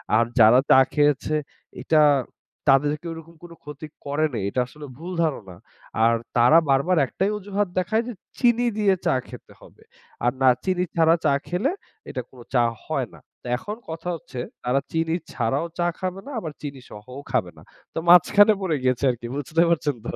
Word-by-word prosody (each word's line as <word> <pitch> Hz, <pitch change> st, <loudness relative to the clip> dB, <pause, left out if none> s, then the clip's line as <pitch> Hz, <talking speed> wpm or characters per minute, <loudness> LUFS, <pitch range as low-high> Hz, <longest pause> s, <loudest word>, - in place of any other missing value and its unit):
আর 115 Hz, -, +5 dB, 0.2 s
যারা 115 Hz, +3 st, +7 dB
চা -, -, +8 dB
খেয়েছে 150 Hz, 0 st, +2 dB, 0.5 s
এটা 155 Hz, +4 st, +3 dB, 0.7 s
তাদেরকে 145 Hz, +4 st, +2 dB
ওরকম 165 Hz, +1 st, -12 dB
কোনো 170 Hz, -1 st, -11 dB
ক্ষতি 150 Hz, +1 st, -9 dB, 0.2 s
করেনি। 145 Hz, -4 st, -1 dB
এটা 125 Hz, -, -2 dB
আসলেও 145 Hz, +2 st, -11 dB
ভুল 170 Hz, +4 st, -7 dB
ধারণা। 105 Hz, -, -3 dB, 0.5 s
আর 115 Hz, +1 st, +5 dB, 0.2 s
তারা 125 Hz, +7 st, +6 dB
বারবার 140 Hz, +7 st, +2 dB
১ -, -, -14 dB
টাই 195 Hz, +2 st, +2 dB
অজুহাত 205 Hz, 0 st, -2 dB
দেখায় 220 Hz, +5 st, 0 dB
যে 245 Hz, -, -5 dB, 0.3 s
চিনি 240 Hz, -1 st, +3 dB
দিয়ে 205 Hz, -2 st, +3 dB
চা -, -, +3 dB
খেতে -, -, -12 dB
হবে। 475 Hz, -3 st, -18 dB, 0.4 s
আর 120 Hz, -, +4 dB
না 130 Hz, -, +6 dB
চিনি 185 Hz, -1 st, 0 dB
ছাড়া 165 Hz, 0 st, +5 dB
চা 140 Hz, -, +4 dB
খেলে 190 Hz, -, 0 dB, 0.4 s
এটা 130 Hz, -, -4 dB
কোনো 125 Hz, -2 st, -14 dB
চা 120 Hz, -2 st, +4 dB, 0.2 s
হয় -, -, -2 dB
না। -, -, -14 dB, 0.2 s
তা -, -, -11 dB
এখন 210 Hz, +11 st, -6 dB
কথা 165 Hz, +2 st, -5 dB
হচ্ছে 130 Hz, -5 st, -9 dB, 0.2 s
তারা 125 Hz, +3 st, +1 dB
চিনি 165 Hz, 0 st, 0 dB, 0.2 s
ছাড়াও 135 Hz, +7 st, -1 dB
চা 175 Hz, -, +2 dB
খাবে 185 Hz, 0 st, -3 dB
না 285 Hz, -, -8 dB
আবার 160 Hz, -7 st, -6 dB
চিনি 140 Hz, -3 st, -7 dB
সহও 125 Hz, +6 st, -10 dB
খাবে -, -, 0 dB
না। -, -, -14 dB, 0.3 s
তো -, -, -2 dB
মাঝখানে 205 Hz, +5 st, +7 dB
পড়ে 180 Hz, -5 st, 0 dB
গেছে 130 Hz, 0 st, +1 dB
আরকি 120 Hz, -1 st, -7 dB
বুঝতে 150 Hz, +3 st, 0 dB
পারছেন 150 Hz, -4 st, 0 dB
তো? -, -, -4 dB
155 Hz, 180 wpm, -23 LUFS, 130-180 Hz, 0.7 s, চা